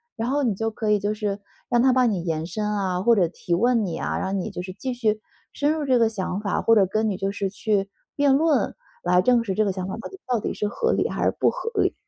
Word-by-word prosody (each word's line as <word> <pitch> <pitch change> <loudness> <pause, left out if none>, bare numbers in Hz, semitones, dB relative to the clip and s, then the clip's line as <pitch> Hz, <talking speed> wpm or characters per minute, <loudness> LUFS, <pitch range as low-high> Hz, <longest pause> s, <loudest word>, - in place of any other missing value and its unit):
然 225 - -2
后 285 +2 +1
你 230 -8 +1
就 225 +2 -2
可 215 0 -3
以 210 - +4
就 205 +1 -1
是 210 -2 -3 0.3
让 240 -1 +3
它 260 -1 +5
帮 255 -2 +4
你 180 -4 -2
延 160 -1 -2
伸 210 +3 -3
啊， 190 -3 -1
或 235 +2 +5
者 185 -5 +3
提 175 +1 -4
问 230 +4 +3
你 170 -3 -3
啊， - - -2
让 195 +1 -1
你 - - -4
就 180 - -6
是 185 0 -7
继 255 +7 -4
续 220 -3 0 0.3
深 290 +1 +1
入 310 -2 -2
这 255 -3 +3
个 230 - +4
想 195 -2 -3
法， 200 -3 -1
或 230 - +5
者 200 -4 +5
跟 215 +2 0
你 - - -2
就 195 +1 -2
是 195 -1 -3
去 200 -1 0 0.3
辩 285 -1 +3
论， 295 -5 +2 0.3
来 180 +1 +4
证 240 +2 +3
实 195 - -2
这 215 - +2
个 200 - +1
想 185 0 -4
法 190 - -4 0.3
到 245 -3 +1
底 - - -3
是 210 - -1
合 460 - 0
理 - - +1
还 - - -2
是 - - +4
不 - - +4
合 - - -4
理？ - - +2
210 Hz, 295 characters per minute, -24 LUFS, 190-240 Hz, 0.3 s, 它